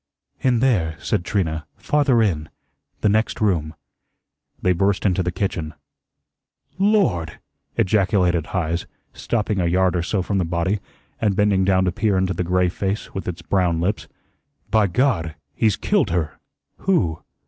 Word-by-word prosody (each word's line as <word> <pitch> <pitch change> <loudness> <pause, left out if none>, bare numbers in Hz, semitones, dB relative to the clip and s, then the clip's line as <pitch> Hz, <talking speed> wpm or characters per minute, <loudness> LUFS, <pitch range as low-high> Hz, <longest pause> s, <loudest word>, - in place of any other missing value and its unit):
"In 125 -3 +2
there," 95 -12 +2
said 85 - -1
Trina, 80 -6 -1
"farther 130 +1 +2
in 80 -7 -1 0.5
the - - +3
next 110 +2 +1
room." 85 -7 0 0.8
They 90 - +2
burst 95 +3 +1
into 95 -1 +2
the 90 0 -1
kitchen. 85 -4 -3 1.0
"LORD!" 195 - +2 0.4
ejaculated 90 -4 +2
Heise, 85 -2 -2 0.3
stopping 105 -3 -1
a 90 - +1
yard 90 +1 +2
or 85 - +1
so 95 +2 -1
from 100 +1 -1
the - - +2
body, 85 +4 0 0.4
and 105 -3 +2
bending 100 -2 +3
down 95 -1 +3
to 90 - +1
peer 105 0 +1
into 95 0 +1
the 90 - -2
gray 90 +1 +2
face 95 +3 -3
with 95 - -5
its 85 -1 -5
brown 85 -1 +1
lips. 95 +5 -1 0.6
"By 110 -2 +4
God! 90 - 0 0.2
he's 105 +4 +2
killed - - +1
her." 85 -3 -2 0.4
"Who?" 90 - 0
95 Hz, 150 wpm, -22 LUFS, 85-105 Hz, 1.0 s, By